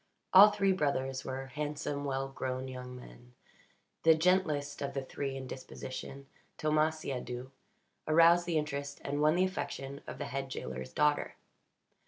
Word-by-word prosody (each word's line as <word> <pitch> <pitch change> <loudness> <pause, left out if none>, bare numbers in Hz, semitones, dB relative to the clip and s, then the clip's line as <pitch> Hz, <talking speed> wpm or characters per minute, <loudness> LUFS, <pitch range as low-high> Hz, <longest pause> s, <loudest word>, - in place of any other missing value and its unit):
All 200 +3 +11
three 200 -2 +2
brothers 135 -6 0
were 135 0 -4
handsome, 145 -1 -3
well 135 -1 -1
grown 130 -1 -4
young 125 -1 -7
men. - - -13 0.7
The 160 0 +6
gentlest 160 -4 +1
of 140 0 -3
the 135 - -1
three 135 0 -4
in 130 - -6
disposition 130 +1 -7 0.3
Thomas 155 +1 +2
Siadoux 125 -2 -5 0.6
aroused 170 +2 +6
the 170 -2 +1
interest 140 -2 -3
and 145 +1 -2
won 155 +2 +4
the 180 - +3
affection 140 -6 -4
of - - -6
the 145 - -4
head 135 +1 -4
jailer's 65 - -5
daughter. 150 - +1
140 Hz, 150 wpm, -32 LUFS, 130-155 Hz, 0.7 s, All